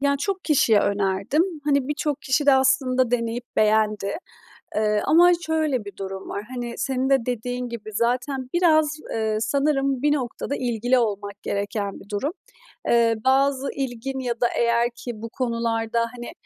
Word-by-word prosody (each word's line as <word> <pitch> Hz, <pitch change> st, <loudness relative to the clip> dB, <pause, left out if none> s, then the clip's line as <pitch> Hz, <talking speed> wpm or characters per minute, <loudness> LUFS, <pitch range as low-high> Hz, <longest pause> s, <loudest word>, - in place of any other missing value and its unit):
Ya, 280 Hz, 0 st, +2 dB
çok 385 Hz, +2 st, -2 dB
kişiye 235 Hz, -8 st, +4 dB
önerdim. 200 Hz, -, +1 dB, 0.2 s
Hani, 280 Hz, -2 st, +1 dB
birçok 295 Hz, -1 st, -2 dB
kişi 275 Hz, +2 st, +1 dB
de 280 Hz, -, +7 dB
aslında 260 Hz, -2 st, +2 dB
deneyip 235 Hz, 0 st, -1 dB
beğendi. 215 Hz, -1 st, +2 dB, 0.6 s
Eee, 210 Hz, -1 st, +2 dB
ama 350 Hz, +3 st, +6 dB
şöyle 310 Hz, -8 st, 0 dB
bir 200 Hz, -, -10 dB
durum 190 Hz, 0 st, -6 dB
var, 200 Hz, -, -4 dB
hani, 240 Hz, -1 st, -4 dB
senin 265 Hz, 0 st, -1 dB
de 270 Hz, -4 st, +3 dB
dediğin 245 Hz, +1 st, -3 dB
gibi 230 Hz, -2 st, -7 dB
zaten 250 Hz, +4 st, -1 dB
biraz, 315 Hz, -3 st, +3 dB
eee, 220 Hz, -1 st, 0 dB
sanırım 275 Hz, +2 st, +1 dB
bir 295 Hz, +1 st, +3 dB
noktada 270 Hz, 0 st, -3 dB
ilgili 245 Hz, 0 st, +1 dB
olmak 205 Hz, -3 st, -2 dB
gereken 200 Hz, 0 st, -3 dB
bir 195 Hz, -, -16 dB
durum. 220 Hz, +8 st, -1 dB, 0.6 s
Eee, 230 Hz, -1 st, +4 dB
bazı 270 Hz, +1 st, +3 dB
ilgin 265 Hz, 0 st, -4 dB
ya 240 Hz, -2 st, -3 dB
da 240 Hz, -, +5 dB
eğer 235 Hz, 0 st, +2 dB
ki 240 Hz, +1 st, -6 dB
bu 230 Hz, -, -5 dB
konularda, 230 Hz, -1 st, -1 dB, 0.2 s
hani, 240 Hz, -1 st, -7 dB
245 Hz, 155 wpm, -23 LUFS, 220-275 Hz, 0.6 s, de